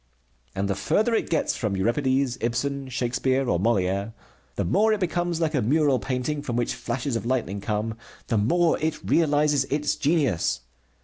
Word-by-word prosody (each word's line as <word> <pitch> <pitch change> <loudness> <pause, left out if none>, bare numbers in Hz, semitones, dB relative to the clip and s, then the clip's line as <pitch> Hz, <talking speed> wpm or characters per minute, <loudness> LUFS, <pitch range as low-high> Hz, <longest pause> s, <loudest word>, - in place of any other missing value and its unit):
And 100 +1 -1
the 100 - +1
further 210 - +1
it 225 - 0
gets 160 - 0
from 105 -4 -2
Euripides, 130 +4 +1
Ibsen, 135 +3 -2
Shakespeare, 130 +2 0
or 85 - +1
Molière 100 0 0 0.4
the - - -1
more 215 - +3
it 215 - -1
becomes 175 -1 -1
like 160 -2 0
a 135 - +1
mural 140 +2 +2
painting 135 +3 -2
from 125 -5 -4
which 120 -1 0
flashes 120 +1 -3
of 115 - -2
lightning 115 -6 -1
come 105 +2 -2 0.3
the 115 - +1
more 170 +10 +2
it 155 0 -1
realizes 150 -3 +3
its 150 +2 0
genius. 125 - +1
130 Hz, 170 wpm, -25 LUFS, 115-150 Hz, 0.4 s, more